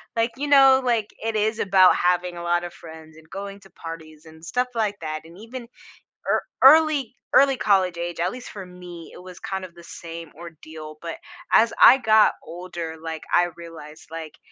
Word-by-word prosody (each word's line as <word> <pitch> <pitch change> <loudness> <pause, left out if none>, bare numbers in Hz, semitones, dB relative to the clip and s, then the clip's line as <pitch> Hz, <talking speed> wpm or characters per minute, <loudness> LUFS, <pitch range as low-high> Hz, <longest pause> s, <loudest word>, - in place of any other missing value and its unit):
like, 230 +1 0
you 290 - -3
know, 270 -2 +6
like, 230 -4 0 0.2
it 225 -1 -2
is 215 +1 0
about 190 -1 +5
having 180 0 0
a 170 - -7
lot 175 0 0
of 175 - -7
friends, 160 -1 -13
and 160 0 -18
going 200 +1 -7
to 195 - -18
parties, 160 -1 -10
and 160 0 -16
stuff 250 +8 -1
like 215 -3 -1
that, 155 0 -5
and 165 +2 -15
even 240 +3 -9
ea - - -16 1.0
early 290 -4 +5 0.2
early 275 -1 +5
college 185 -5 +1
age, 170 0 -5
at 180 +2 0
least 250 +2 -9
for 200 -2 -8
me, 180 -2 -11
it - - -13
was 180 -1 -12
kind 190 -1 -5
of 175 - -14
the 170 0 -15
same 165 -1 -9
ordeal, 155 -2 -11
but 165 -1 -6 0.4
as 230 +1 +4
I 260 - +9
got 220 -4 +4
older, 170 -2 -7
like, 160 -1 -6
I 175 0 +4
realized, 165 -2 -12
like, 160 -1 -8
180 Hz, 195 wpm, -23 LUFS, 165-220 Hz, 1.0 s, I